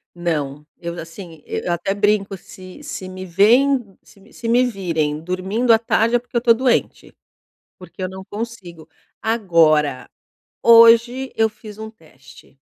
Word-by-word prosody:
Não. 150 -4 -3
Eu 170 0 -6
já 170 - -6
sim 165 -2 -12
e - - -4
eu 175 - 0
até 175 +3 -2
brinco 205 -1 0
se 185 +6 -13
se 190 -10 -7
me 185 0 -8
vêem, 225 +4 +2
se 200 - -21
me 205 +4 -21
se 230 - -7
me 245 +2 +3
virem 165 -10 -2
dormindo 190 +8 0
à 225 - +5
tarde, 230 +1 +1
é - - +2
porque 245 +1 -10
eu - - +3
tô 235 -1 +4
doente, 250 +1 -1 0.6
porque - - -13
eu 185 - -2
não 190 0 -9
consigo. 200 -7 -8 0.3
Agora, 160 - +1 0.5
hoje 235 +3 +5
eu 220 0 +2
fiz 215 -1 -13
um 220 0 -7
teste, 155 - -19
195 Hz, 165 wpm, -20 LUFS, 170-230 Hz, 0.6 s, à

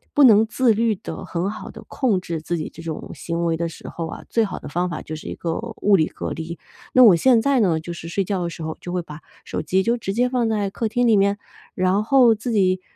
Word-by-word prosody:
不 290 - +6
能 220 -3 +7
自 240 0 +2
律 225 0 +1
地 200 - -7
很 175 +2 -2
好 215 -2 -8
地 - - -11
控 235 -9 0
制 165 -3 -4
自 175 +2 -2
己 155 - -5
这 165 - -10
种 160 -2 -6
行 170 0 -3
为 165 -1 +1
的 170 0 -2
时 - - -11
候 165 -1 -5
啊， - - -8
最 230 - +2
好 200 - -6
的 - - -9
方 175 +5 -1
法 155 - -5
就 155 - -6
是 155 - -9
一 - - -5
个 165 -1 -3 0.2
物 205 -1 +5
理 160 -4 +3
隔 - - -6
离。 165 +1 -6 0.4
那 255 - +7
我 205 -7 +8
现 240 +7 +4
在 275 0 +2
呢 170 -7 +2
就 170 +2 -7
是 165 - -8
睡 195 +4 -1
觉 190 -1 -2
的 170 - -2
时 165 - -8
候 160 0 -4
就 175 - -6
会 180 -1 -2
把 150 -1 -10 0.3
手 - - -3
机 185 +5 +1
就 235 +3 +2
直 215 -5 -4
接 245 +4 +2
放 245 -3 0
在 205 -3 -1
客 225 +2 -2
厅 245 +2 +1
里 225 - +5
面， 200 0 +2 0.4
然 185 +3 +2
后 245 -1 +5
自 220 +3 -4
己， 185 -4 +2
195 Hz, 290 characters per minute, -22 LUFS, 170-225 Hz, 0.4 s, 我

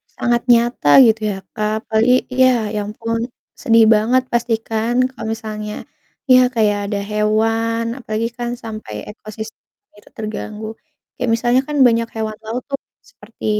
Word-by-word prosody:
sangat 240 -1 +1
nyata 235 -9 +2 0.2
gitu 220 -1 +3
ya, - - -4 0.2
Kak. 215 +1 -2
Apalagi 225 +3 +2 0.2
iya, 260 0 +5 0.3
ya 210 - -1
ampun, 230 +2 -3 0.4
sedih 230 -1 +5
banget 240 +5 +2
pasti 235 -1 +1
kan 225 +2 -1 0.2
kalau 225 -3 -8
misalnya 215 -1 -6 0.6
iya, 255 - +8 0.2
kayak 210 -2 +2
ada 205 - 0
hewan, 225 +2 +1 0.2
apalagi 220 -1 -2
kan 240 0 -3
sampai 215 - -7 0.2
ekosistem 220 +1 -9 0.4
itu - - -21
terganggu. 215 0 -5 0.5
Kayak 250 - -1
misalnya 245 +2 +2
kan 300 - -4
banyak 230 0 +1
hewan 215 -1 -3
laut 240 +3 -4
tuh, 275 - -3 0.3
seperti 230 - -13
225 Hz, 145 wpm, -19 LUFS, 215-235 Hz, 0.6 s, iya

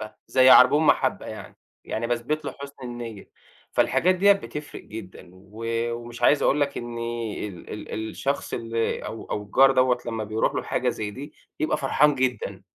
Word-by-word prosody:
محبة، 110 0 -8
زي 130 0 +5
عربون 145 +5 +7
محبة - - +2
يعني، - - -9 0.3
يعني 115 +1 -3
باثبت 120 +6 -2
له - - -4
حُسن 140 0 -8
النية. 120 -4 -7 0.4
فالحاجات 185 +2 +3
ديَّة 200 +2 +6
بتفرِق 150 -7 -6
جدًا، 95 -4 -10
و 105 +5 -11 0.3
ومش 120 0 -8
عايز 145 +4 +4
أقول 145 - +3
لك 140 -1 0
إني 115 -2 -4
ال 90 -3 -11
ال 110 +1 -5
الشخص 140 +1 -2
اللي 115 -1 -2
أو 115 - -7
أو 105 - -2
الجار 135 +6 +5
دوَّة، 130 -1 +3
لمّا 115 -2 -3
بيرُوح 110 +1 0
له - - -1
حاجة - - -1
زي 105 -1 -2
دي، 145 +7 -9 0.3
بيبقى 155 +1 +1
فرحان 150 +2 +3
جدًا. 130 -1 -2
120 Hz, 175 wpm, -25 LUFS, 110-140 Hz, 0.4 s, عربون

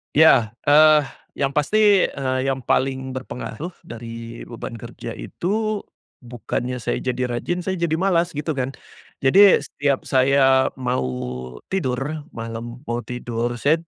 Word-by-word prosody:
Iya, 140 -8 +6 0.2
eee, 150 0 +6 0.3
yang 140 -1 0
pasti, 205 +6 +4
eee, 130 -1 -1
yang 135 0 0
paling 130 +1 -1
berpengaruh 130 +6 -6
dari 115 0 -8
beban 115 0 -7
kerja 115 - -8
itu 215 +3 -2 0.4
bukannya 120 +1 -4
saya 120 - -1
jadi 125 0 -1
rajin 175 +9 -2
saya 190 -1 -2
jadi 170 -2 +1
malas 175 -2 +1
gitu 150 +2 -2
kan. 135 -2 -3 0.5
Jadi 195 +9 +7
setiap 140 -2 -1
saya 135 0 +4
mau 125 - -1 0.6
tidur 145 -3 -2
malam, 115 +2 -6
mau 120 -3 -2
tidur, 120 -1 -3
saya 145 +7 +2
135 Hz, 130 wpm, -22 LUFS, 120-155 Hz, 0.6 s, Jadi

